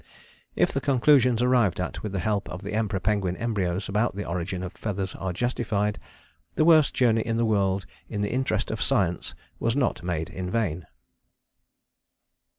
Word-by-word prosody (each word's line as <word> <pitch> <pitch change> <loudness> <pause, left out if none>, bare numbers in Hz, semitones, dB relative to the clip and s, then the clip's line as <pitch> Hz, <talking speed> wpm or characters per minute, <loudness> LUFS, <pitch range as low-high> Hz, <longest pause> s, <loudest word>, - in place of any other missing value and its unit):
"If - - +3
the - - -1
conclusions 125 -3 +4
arrived 120 -8 +3
at 90 - -3
with 105 - -4
the 100 - -2
help 100 +3 -1
of 90 +3 -7
the 100 - -5
Emperor 105 -3 0
Penguin 95 -3 0
embryos 100 -5 -1
about 105 +2 0
the 100 - -4
origin 90 +1 -3
of 90 - -5
feathers 95 -3 -3
are 95 -1 -4
justified, 105 -1 -1 0.6
the 155 - +3
worst 160 -4 +5
journey 115 -3 +3
in 115 +1 -1
the 115 - +2
world 100 -3 +1 0.2
in 105 - -3
the 105 - -1
interest 125 -5 0
of 110 0 -4
science 90 -3 0 0.2
was 115 +1 0
not 135 -3 0
made 85 -1 -3
in 90 -1 -4
vain." 90 -6 -1
105 Hz, 170 wpm, -26 LUFS, 95-115 Hz, 0.6 s, worst